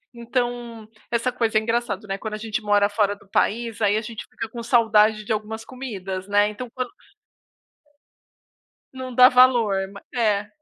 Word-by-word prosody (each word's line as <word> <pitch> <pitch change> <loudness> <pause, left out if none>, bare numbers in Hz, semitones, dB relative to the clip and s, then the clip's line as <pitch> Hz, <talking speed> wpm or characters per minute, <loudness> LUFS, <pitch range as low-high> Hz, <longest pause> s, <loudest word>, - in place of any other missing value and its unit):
então, 240 -2 -3 0.2
essa 235 +2 0
coisa 225 -3 +1
é - - +3
engraçada, 225 -3 -2
né. 195 0 -3
Quando 215 +1 -5
a - - -5
gente 220 +1 -3
mora 205 -1 +3
fora 205 -1 +1
do 200 - -22
país, 230 +2 0
aí 205 0 +3
a - - -1
gente 225 -1 -7
fica - - -6
com 235 +1 -7
saudade 220 -3 +3
de 220 - 0
algumas 220 +1 -5
comidas, 195 -8 -6
né. 205 0 +4
Então 225 +4 -6
quando 255 -1 -3 2.0
Não 260 -1 -7
dá 250 +1 +8
valor. 250 -5 +5 0.2
Ma 200 - -11
é. 210 -4 +1
220 Hz, 170 wpm, -23 LUFS, 210-240 Hz, 2.0 s, dá